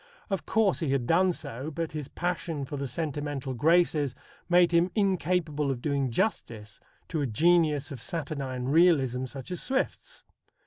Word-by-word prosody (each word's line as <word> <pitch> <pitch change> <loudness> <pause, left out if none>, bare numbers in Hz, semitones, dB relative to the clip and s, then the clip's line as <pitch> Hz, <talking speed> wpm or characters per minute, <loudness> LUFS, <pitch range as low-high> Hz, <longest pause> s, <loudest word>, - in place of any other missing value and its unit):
Of 195 - -2
course 220 -4 +2
he 160 - -1
had 135 -3 0
done 180 +7 +3
so, 135 -3 -5
but 165 +1 -4
his 150 -3 -5
passion 165 -3 -3
for 145 - -6
the 140 -1 -3
sentimental 145 -1 -3
graces 150 0 +2 0.3
made 175 0 +5
him 170 +1 +3
incapable 180 -7 0
of 130 -3 -2
doing 140 0 0
justice 115 - -2 0.3
to 160 -3 -1
a 140 - 0
genius 150 +3 +2
of 130 -5 -7
saturnine 140 -6 -4
realism 135 -4 +3
such 135 +5 -8
as 180 - -2
Swift's. 270 - -2
150 Hz, 155 wpm, -28 LUFS, 135-175 Hz, 0.3 s, made